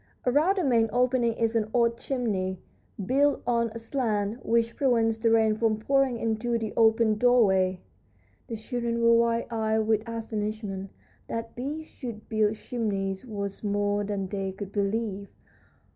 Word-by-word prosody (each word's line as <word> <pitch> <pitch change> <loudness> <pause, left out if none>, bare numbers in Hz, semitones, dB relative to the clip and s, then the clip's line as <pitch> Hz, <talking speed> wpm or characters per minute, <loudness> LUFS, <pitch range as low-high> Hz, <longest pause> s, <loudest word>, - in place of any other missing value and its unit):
Around 300 +10 +3
the 370 - +1
main 230 -5 +3
opening 245 -1 +2
is 230 0 -1
an 215 -1 +1
odd 235 -1 +3
chimney, 210 -8 -2 0.5
built 280 +5 +2
on 235 -1 +2
a 225 - -8
slant, 225 -2 -2
which 230 0 +1
prevents 230 -4 +2
the 230 0 +2
rain 220 -1 +4
from 220 -1 +1
pouring 270 +2 +1
into 230 +1 -1
the 220 -2 -4
open 220 -1 +3
doorway." 190 -7 +3 0.7
The 230 - -4
children 235 +1 -3
were 230 0 +5
wide 230 0 +2
eyed 220 -1 +1
with 215 -1 +2
astonishment. 215 -3 -4 0.4
That 230 0 -5
bees 290 +6 -4
should 235 -8 -8
build 215 -1 +2
chimneys 200 -2 -3
was 200 -2 -5
more 205 0 0
than 200 -2 -3
they 195 0 -3
could 195 0 -7
believe! 200 0 -2
225 Hz, 150 wpm, -27 LUFS, 210-235 Hz, 0.7 s, were